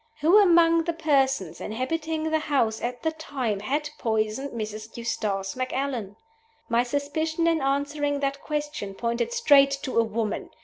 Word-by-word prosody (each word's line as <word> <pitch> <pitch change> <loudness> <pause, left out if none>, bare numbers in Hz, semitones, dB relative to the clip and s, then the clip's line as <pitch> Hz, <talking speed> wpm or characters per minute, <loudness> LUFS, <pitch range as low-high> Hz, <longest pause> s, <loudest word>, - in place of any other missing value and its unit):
Who 340 +8 +6
among 335 -3 +5
the 340 - 0
persons 270 - +1
inhabiting 315 +7 -2
the 315 - +2
house 260 -8 0
at 245 0 -4
the 320 - +1
time 265 -9 -3
had 290 +8 -2
poisoned 220 +4 -1
Mrs. 215 -1 -6
Eustace 205 -5 -2
Macallan? 255 -5 -3 0.5
My 230 +1 +3
suspicion 305 +5 -1
in 330 -2 +2
answering 285 +1 0
that 275 0 -1
question 295 -10 -4
pointed 235 - -1
straight 285 - +5
to 255 -4 0
a - - +5
woman. 220 -1 -3
275 Hz, 145 wpm, -26 LUFS, 230-310 Hz, 0.5 s, Who